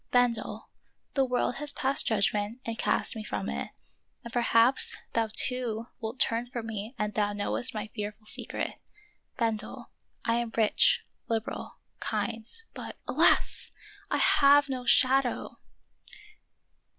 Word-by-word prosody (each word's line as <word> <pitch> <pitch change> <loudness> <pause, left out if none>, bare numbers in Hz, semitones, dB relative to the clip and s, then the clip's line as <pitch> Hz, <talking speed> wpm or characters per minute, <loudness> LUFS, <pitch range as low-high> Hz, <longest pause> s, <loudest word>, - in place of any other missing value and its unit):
Bendel, 245 -2 0 0.5
the 270 - +3
world 250 -1 0
has 295 +1 +1
passed 275 0 +1
judgment 210 +1 0
and 230 - -3
cast - - +1
me 220 - -5
from - - -4
it, 70 +1 -4 0.5
and 235 0 -9
perhaps 235 +1 +5 0.2
thou 225 -1 +1
too 235 -2 0
wilt 225 +2 -5
turn 235 +1 +2
from 240 -2 -5
me 220 +2 -5
when 210 -1 -1
thou 205 -1 0
knowest 220 +4 +1
my 215 - -3
fearful 210 0 -6
secret. - - -2 0.6
Bendel, 230 +1 -2 0.3
I 230 0 +2
am 235 -1 -3
rich, 220 -2 +3 0.2
liberal, 225 -1 -4 0.2
kind, 225 -1 -3 0.2
but - - -8
— - - -39
alas! - - +2 0.2
— 415 - -21
I - - +1
have 285 0 +5
no 255 -2 -4
shadow!" 260 -1 +2
230 Hz, 140 wpm, -28 LUFS, 215-250 Hz, 0.6 s, perhaps